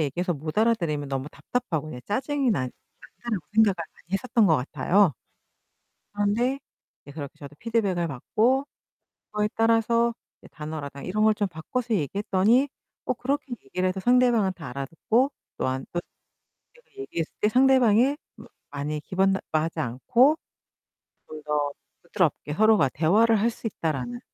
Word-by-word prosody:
얘기해서 175 +5 -1
못 155 +3 -4
알아들으면 170 -11 +1
너무 135 +1 -3
답답하고 175 - -3
그냥 125 -5 -7
짜증이 270 +4 0
난 130 - 0 0.3
난다라고 215 -10 -5
생각을 220 -3 +5
많이 170 +1 -10
했었던 220 +2 +2
것 160 -4 +5
같아요. 175 +7 +2 1.0
그런데 215 +6 +1 0.4
이제 145 - -12
그렇게 140 -2 -7
저도 145 0 -11
피드백을 200 -7 0
받고 225 - +1 0.7
그거에 210 0 0
따라서 230 +1 +3 0.3
이제 - - -16
단어라든가 150 -3 -7
이런 215 +4 0
걸 220 - +5
좀 205 -1 0
바꿔서 225 +8 -3
얘기했더니 200 - +2 0.4
어 - - +1
그렇게 275 +2 -2
얘기를 180 +7 -1
해서 185 +1 -3
상대방은 240 -3 +3
다 160 -7 -9
알아듣고 165 - 0 0.3
또한 130 +1 -2
또 175 - -1 0.7
내가 485 0 -24
얘기했을 170 - -4
때 210 - +4
상대방이 260 +1 +4 0.2
마 - - -13 0.3
많이 145 +1 -3
기분 190 +4 +1
나빠하지 160 -3 -2
않고 230 - +3 0.9
'좀 155 -1 -9
더 150 -1 0 0.3
부드럽게 170 -5 -1
서로가 215 -6 +4
대화를 210 - +3
할 230 - +3
수 225 - -6
있다.'라는 130 - -3
195 Hz, 345 characters per minute, -26 LUFS, 150-230 Hz, 1.0 s, 생각을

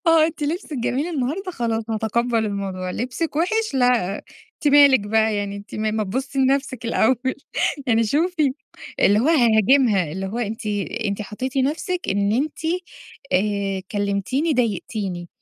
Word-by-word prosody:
آه 330 -1 +6
أنتِ 320 -2 -6
لبسِك 320 +1 -3
جميل 260 +5 -1
النهارده، 335 +4 -2
خلاص 230 -7 -2
هاتَقَبّل 225 +1 0
الموضوع، 195 -2 -3
لبسِك 255 - -3
وِحِش؟ 435 +3 0
لا 245 -7 +2 0.4
أنتِ 295 - 0
مالِك 280 -3 +7
بقى 220 +1 +1
يعني؟ 200 0 -3
أنتِ 200 0 -10
ما 215 0 -1
ما 215 0 -1
تبُصي 260 +7 -3
لنَفسِك 265 -2 +1
الأول. 250 +3 +1 0.5
يعني 230 -2 +3
شوفي 305 - +1 0.5
اللي 205 - +5
هو 265 - +2
هاهاجمها، 230 - +4
اللي 190 +3 -4
هو 220 +5 -4
أنتِ 220 -1 -4 0.4
أنتِ 200 +1 -2
حطّيتِ 255 +6 -5
نَفسِك 325 +7 -1
إن 200 +1 +1
أنتِ 285 +6 -1 0.7
آآ، 195 0 0
كلِّمتيني 205 - 0
ضايقتيني، 200 -6 -2
235 Hz, 145 wpm, -22 LUFS, 205-280 Hz, 0.7 s, مالِك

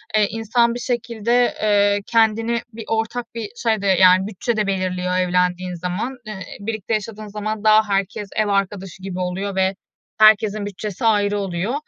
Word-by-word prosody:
eee, 210 -1 +4
insan 230 +2 +1
bir 245 - -5
şekilde, 240 0 0
eee, 205 -1 +3
kendini 225 +1 +2
bir 225 -1 -8
ortak 225 +1 -2
bir 220 -3 -4
şey 225 -3 0
de, 200 - -1
yani, 185 0 +5
bütçe 220 +3 -3
de 210 -2 0
belirliyor 185 -1 -1
evlendiğin 180 0 0
zaman. 180 +9 -4
Eee, 215 - -6 0.3
birlikte 220 +1 -4
yaşadığın 215 0 -4
zaman 210 +1 -4
daha 215 0 +5
herkes 200 +1 -1
ev 215 -1 +1
arkadaşı 195 -1 -2
gibi 185 -1 -5
oluyor 185 +2 -3
ve 190 0 +1 0.4
herkesin 215 -1 +5
bütçesi 205 +2 -5
ayrı 205 -2 +2
oluyor. 195 +4 -2
205 Hz, 160 wpm, -21 LUFS, 190-225 Hz, 0.4 s, yani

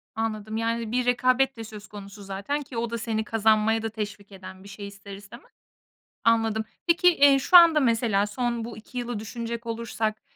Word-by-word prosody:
Anladım, 220 -1 -3
yani, 230 0 -2
bir 250 +1 0
rekabet 255 +1 +2
de 225 - -6
söz 215 -1 -11
konusu 200 0 -11
zaten 200 +10 -3
ki 260 -4 -9
o 235 0 -2
da 235 - -3
seni 220 -1 -2
kazanmaya 220 0 +2
da 225 - -3
teşvik 205 -2 -7
eden 190 0 -11
bir 200 - -12
şey 200 0 -8
ister 200 0 -11
istemez. 205 +6 -14 0.7
Anladım. 225 -1 +2 0.2
Peki, 345 +1 +4
eee, 280 -1 +6
şu 355 +7 +5
anda 335 -3 +8
mesela 230 -5 +2
son 235 +1 -2
bu 235 0 -8
2 225 +3 -9
yılı 240 -2 -4
düşünecek 235 +2 -6
olursak, 225 -1 -3
225 Hz, 185 wpm, -25 LUFS, 210-240 Hz, 0.7 s, anda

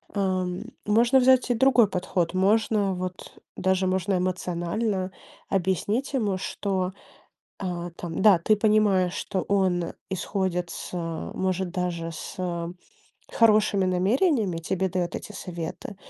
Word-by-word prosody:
Ам, 185 -2 -1 0.2
можно 235 +5 +4
взять 255 -1 +4
и 245 - +2
другой 250 -3 +5
подход, 180 -2 -1
можно 200 +1 +2
вот 180 0 -6 0.2
даже 190 0 +1
можно 185 +1 +1
эмоционально 185 +2 -1 0.4
объяснить 195 - 0
ему, 210 -8 0
что, 185 -1 -2 0.7
э, - - -3 0.3
там 170 0 -4
да, 200 -3 +7
ты 215 +5 +3
понимаешь, 205 -4 +3
что 190 - -2
он 185 -4 0 0.2
исходит 185 -2 -1
с - - -7 0.4
может 185 -1 -1
даже 170 -2 -2
с 160 - -8 1.0
хорошими 215 -3 +4
намерениями, 200 - +2
тебе 190 +3 -1
даёт 180 -1 -2
эти - - -8
советы, 175 +1 -6
190 Hz, 120 wpm, -26 LUFS, 180-210 Hz, 1.0 s, да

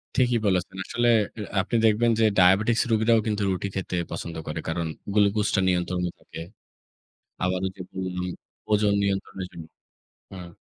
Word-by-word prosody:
ঠিকই 125 -2 +3
বলেছেন। 95 -1 0
আসলে 120 0 0 0.3
এ - - -3 0.2
আপনি 110 - -3
দেখবেন 110 +2 +3
যে, - - +4
ডায়াবেটিকস 95 +5 +4
রুগীরাও 110 +1 +4
কিন্তু 105 -1 -1
রুটি 95 +1 -2
খেতে 95 -1 -3 0.2
পছন্দ 85 0 -5
করে। 75 +1 -3
কারণ 80 0 -2 0.3
গ্লুকোজটা 105 0 +2
নিয়ন্ত্রণে 90 0 0
থাকে। 80 - -10 1.0
আবার 90 0 0
যে 95 - -9
বললাম, 90 -1 -3 0.5
ওজন 105 -1 +3
নিয়ন্ত্রণের 95 -1 -2
জন্য 85 - -9 0.7
হুম। 90 -2 -9
95 Hz, 140 wpm, -25 LUFS, 90-105 Hz, 1.0 s, যে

